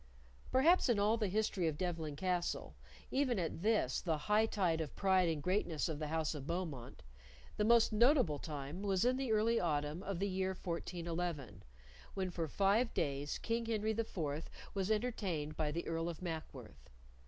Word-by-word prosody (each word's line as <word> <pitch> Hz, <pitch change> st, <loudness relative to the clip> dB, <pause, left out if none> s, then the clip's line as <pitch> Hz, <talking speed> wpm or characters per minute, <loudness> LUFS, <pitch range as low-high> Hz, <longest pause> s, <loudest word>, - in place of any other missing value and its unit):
Perhaps 310 Hz, +4 st, +5 dB
in 235 Hz, -, +4 dB
all 210 Hz, +2 st, +3 dB
the 220 Hz, -3 st, 0 dB
history 195 Hz, -3 st, 0 dB
of 155 Hz, -2 st, -1 dB
Devlen 160 Hz, -4 st, -2 dB
Castle, 180 Hz, +2 st, -1 dB, 0.4 s
even 260 Hz, -4 st, +1 dB
at 165 Hz, -2 st, -2 dB
this, 210 Hz, -, +2 dB
the 160 Hz, -3 st, 0 dB
high 210 Hz, +8 st, +2 dB
tide 175 Hz, -7 st, +1 dB
of 150 Hz, -, -5 dB
pride 190 Hz, -3 st, +3 dB
and 155 Hz, -3 st, -2 dB
greatness 180 Hz, -5 st, 0 dB
of 155 Hz, -3 st, -3 dB
the 155 Hz, -, -2 dB
house 160 Hz, +1 st, 0 dB
of 145 Hz, -2 st, -7 dB
Beaumont, 155 Hz, -, -4 dB, 0.5 s
the 210 Hz, -, +2 dB
most 230 Hz, 0 st, +5 dB
notable 235 Hz, -, +4 dB
time 150 Hz, +4 st, -5 dB
was 195 Hz, 0 st, +1 dB
in 250 Hz, +1 st, +3 dB
the 265 Hz, -3 st, -1 dB
early 220 Hz, +2 st, +3 dB
autumn 150 Hz, 0 st, -1 dB
of 195 Hz, -2 st, -3 dB
the 200 Hz, +3 st, 0 dB
year 190 Hz, -1 st, -1 dB
1411, 170 Hz, -, -3 dB, 0.5 s
when 190 Hz, -2 st, -1 dB
for 165 Hz, -2 st, -2 dB
five 205 Hz, -, +2 dB
days 140 Hz, +1 st, -1 dB
King 230 Hz, 0 st, -2 dB
Henry 220 Hz, -1 st, 0 dB
IV 165 Hz, -9 st, -3 dB, 0.2 s
was 195 Hz, 0 st, -1 dB
entertained 200 Hz, -9 st, -1 dB
by 150 Hz, -1 st, 0 dB
the 170 Hz, +3 st, -3 dB
Earl 165 Hz, +1 st, -1 dB
of 165 Hz, -, -6 dB
Mackworth. 165 Hz, -3 st, -7 dB
180 Hz, 175 wpm, -36 LUFS, 155-215 Hz, 0.5 s, Perhaps